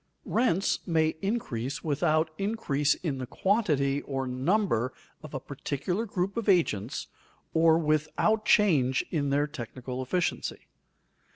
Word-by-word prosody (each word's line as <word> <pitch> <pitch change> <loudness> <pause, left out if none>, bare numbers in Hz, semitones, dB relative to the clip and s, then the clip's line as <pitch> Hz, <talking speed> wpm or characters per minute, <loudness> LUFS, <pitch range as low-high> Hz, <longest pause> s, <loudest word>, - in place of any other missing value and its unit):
_ - - -44 0.2
Rents 205 -6 +1
may 160 -2 +3
increase 140 - -2
without 155 +1 +1
increase 175 -9 +1
in 145 -7 -3
the 130 - -4
quantity 150 - +1
or 135 -1 -3
number 130 - +1 0.3
of 155 -2 -9
a - - -1
particular 145 - -3
group 195 +1 -2
of 225 -2 -1
agents 130 - +1 0.5
or 160 0 +5
without 155 +7 +1
change 145 -13 +3
in 145 -4 0
their 145 +1 +2
technical 130 -1 -6
efficiency. 170 +7 -1
155 Hz, 125 wpm, -28 LUFS, 135-190 Hz, 0.5 s, or